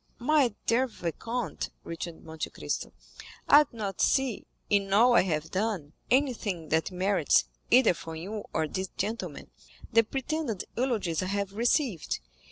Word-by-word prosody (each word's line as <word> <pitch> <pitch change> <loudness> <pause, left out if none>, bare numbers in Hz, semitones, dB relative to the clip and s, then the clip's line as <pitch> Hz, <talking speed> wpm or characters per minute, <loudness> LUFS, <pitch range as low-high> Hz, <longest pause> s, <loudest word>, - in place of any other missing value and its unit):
"My 260 -3 +3
dear 250 +3 +3
vicomte," 230 +4 -4
returned 165 0 -6
Monte 160 0 -5
Cristo, - - -4 0.6
"I 295 +1 +8
do 245 - -17
not 200 -4 -3
see, 265 -5 +1 0.2
in 200 -1 +1
all 235 +5 +6
I - - +7
have 160 -4 -2
done, 190 -7 -2 0.2
anything 225 - +1
that 160 +4 +1
merits, 185 -3 +3 0.3
either 250 -5 +6
from 165 -1 -8
you 200 +6 -5
or 160 -1 0
these 190 +4 -3
gentlemen, 225 +2 -4 0.4
the 230 - +7
pretended 270 - -3
eulogies 220 -10 0
I 185 - -2
have 200 0 -2
received. 235 - +1
205 Hz, 145 wpm, -29 LUFS, 175-245 Hz, 0.6 s, I